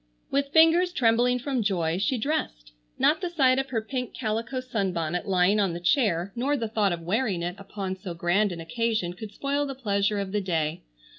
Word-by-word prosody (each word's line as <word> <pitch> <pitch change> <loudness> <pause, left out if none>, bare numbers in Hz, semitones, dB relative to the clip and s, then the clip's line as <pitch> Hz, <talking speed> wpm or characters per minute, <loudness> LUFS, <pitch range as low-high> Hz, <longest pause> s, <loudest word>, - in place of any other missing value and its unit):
With 280 0 +1
fingers 330 +3 +5
trembling 245 -2 +3
from 260 0 -2
joy 175 -5 0
she 260 +6 +1
dressed. - - -3 0.3
Not 320 - +3
the 360 - -2
sight 265 -6 +3
of 270 0 -3
her 225 -4 -1
pink 250 +1 -4
calico 230 +2 -2
sunbonnet 185 -7 -2
lying 190 +2 +3
on 195 -4 +1
the 170 - -4
chair, 185 - +1
nor 275 +5 0
the 230 -3 -2
thought 215 -3 +1
of 170 -1 -3
wearing 195 -1 0
it 175 +1 -2
upon 195 -1 -5
so 185 -2 -7
grand 180 +5 +1
an 170 - -6
occasion, 215 0 -1
could 210 +3 -9
spoil 280 +6 -1
the 275 - -5
pleasure 205 -4 0
of 200 -1 -3
the 210 0 0
day. 160 -5 -1
215 Hz, 200 wpm, -26 LUFS, 180-255 Hz, 0.3 s, fingers